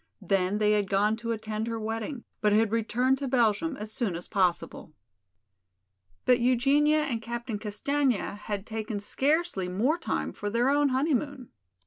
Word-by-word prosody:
Then 190 +1 +1
they 210 0 +3
had 205 -2 +1
gone 205 +2 +2
to 230 0 -4
attend 220 0 -3
her 230 -1 -3
wedding, 225 +4 -4 0.2
but 210 -1 +3
had 215 0 +3
returned 245 +4 +1
to 280 - -3
Belgium 250 +4 +1
as 215 +1 -5
soon 215 -8 -1
as 175 - -5
possible. 180 -5 -1 1.3
But 250 0 +5
Eugenia 275 +5 +3
and 235 -6 -2
Captain 235 -1 -4
Castaigne 260 +5 0
had 205 0 -5
taken 220 -1 -4
scarcely 275 - 0
more 245 - +1
time - - -2
for 205 - -4
their 240 +5 +2
own 290 0 +3
honeymoon. 275 -1 -1
225 Hz, 155 wpm, -28 LUFS, 210-265 Hz, 1.3 s, But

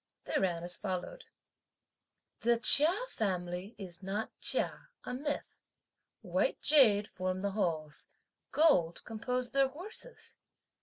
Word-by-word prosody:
They - - -4
ran 175 -3 -1
as 175 +1 -1
follows: 190 - -4 1.2
The 235 +1 +2
"Chia" 290 +7 +8 0.2
family 185 0 -3
is 180 -3 -10
not 200 +3 -4
"chia," - - 0
a 250 - -5
myth; 290 +3 -3 0.8
white - - 0
jade 220 -9 +4
form 185 0 -4
the 200 - -1
Halls; 160 -7 -3 0.4
gold 275 - +3
compose 245 +2 -3
their 275 -1 +3
horses! 380 - -7
210 Hz, 115 wpm, -32 LUFS, 180-265 Hz, 1.2 s, Chia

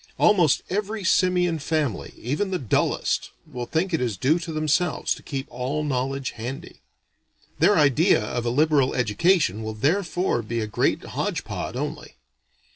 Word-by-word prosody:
Almost 180 -9 +4
every 210 +2 -3
simian 180 -2 +2
family, 150 -5 -2
even 150 - -2
the 185 - -1
dullest, 125 - 0 0.2
will 120 -1 -6
think 170 +6 -1
it 160 - +1
is 115 -6 -1
due 150 - +2
to 170 -1 -6
themselves 155 +2 0
to - - -11
keep 135 -2 -5
all 140 +5 -2
knowledge 135 -1 -2
handy. 120 +4 -7 0.8
Their 205 - +5
idea 150 +4 +4
of 120 +2 -3
a 120 - 0
liberal 140 0 +2
education 125 - +2
will 110 0 -5
therefore 175 - 0
be 115 +1 -3
a 110 - -1
great 105 - 0
hodge - - -3
pod - - -5
only. - - -5
150 Hz, 155 wpm, -24 LUFS, 125-175 Hz, 0.8 s, Their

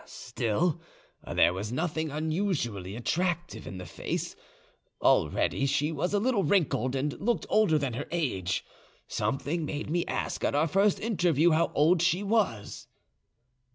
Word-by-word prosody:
Still, 160 +10 -1 0.5
there 85 - +4
was 100 +4 -4
nothing 160 +3 -1
unusually 150 - -2
attractive 175 +7 -2
in 95 - -7
the 90 - -7
face: - - -4 0.6
already 135 - +2
she 145 +3 +1
was 180 +3 -1
a 205 - +2
little 225 -2 +1
wrinkled, 140 - +1
and 140 +2 -1
looked 215 -5 0
older 210 -8 +4
than 140 -4 -2
her 125 - -4
age. 100 - -1 0.4
Something 155 +5 -2
made 150 0 -4
me 170 +1 +1
ask - - -3
at - - +1
our 155 +3 +3
first 195 +5 +2
interview 175 - +2
how 160 +2 +2
old 160 +4 +4
she 175 +3 +2
was. 200 - -1
160 Hz, 145 wpm, -28 LUFS, 135-180 Hz, 0.6 s, there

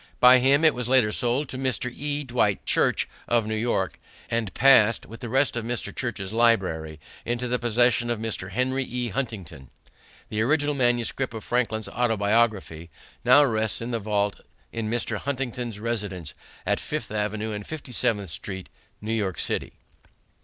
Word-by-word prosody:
By 125 +1 +8
him 140 +5 +4
it 155 - +6
was 125 -1 -3
later 130 -5 +4
sold 125 +5 0
to 130 - -6
Mr. 125 -2 -1
E. 145 +1 -2
Dwight 120 -6 0
Church - - +2 0.2
of 120 -2 +2
New 110 - -3
York, 110 -4 -1 0.3
and 115 -4 -1
passed 120 -4 +5
with 115 0 -11
the 120 - -6
rest 135 +3 +2
of 120 - -2
Mr. 120 +1 -3
Church's 110 -5 -3
library 95 -10 +1 0.2
into 120 +1 -2
the 125 0 0
possession 120 0 +2
of 120 - 0
Mr. 110 -4 -4
Henry 130 +6 0
E. 125 -1 -3
Huntington. 95 - -5 0.6
The 110 - -1
original 145 +4 +2
manuscript 120 -1 0
of 110 - -6
Franklin's 115 -3 -1
Autobiography 105 -7 0 0.3
now 130 +4 +7
rests 110 -4 0
in 115 +2 -4
the 115 - -1
vault 105 -1 -1 0.3
in 115 -2 -3
Mr. 115 -1 -1
Huntington's 125 -3 -3
residence 100 -8 -3 0.3
at - - +1
Fifth - - -4
Avenue 105 +1 -2
and 105 0 -5
Fifty 155 -5 -7
seventh 105 -6 0
Street, 95 +2 -6 0.3
New 110 +2 -3
York 100 -5 -1
City. - - -2
115 Hz, 165 wpm, -25 LUFS, 105-125 Hz, 0.6 s, By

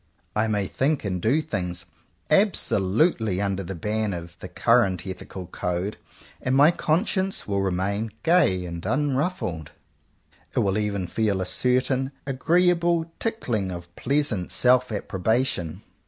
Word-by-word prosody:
I 105 +1 +2
may 105 -2 0
think 135 +6 0
and 90 -3 -2
do 140 - +2
things 90 - -3 0.5
absolutely 110 - +2
under 100 -1 -1
the 95 +2 -6
ban 105 +3 -1
of 85 0 -8
the - - -7
current 95 -3 +2
ethical 95 0 -7
code, 90 +3 -3 0.5
and 130 0 0
my 145 +4 +7
conscience 190 +4 0
will 100 -1 0
remain 100 +4 -1
gay 150 - +3
and 85 -1 -6
unruffled 135 - -1 0.4
— - - -31
it - - +3
will 100 +1 +1
even 100 -3 -1
feel 105 0 0
a 95 - -1
cer 125 +6 +2
tain 130 +1 -1
agreeable 170 +4 +2
tickling 120 - -1
of 85 0 -8
pleasant 135 -12 0
self 125 +5 +3
approbation. 100 -3 -1
105 Hz, 140 wpm, -25 LUFS, 95-140 Hz, 0.5 s, my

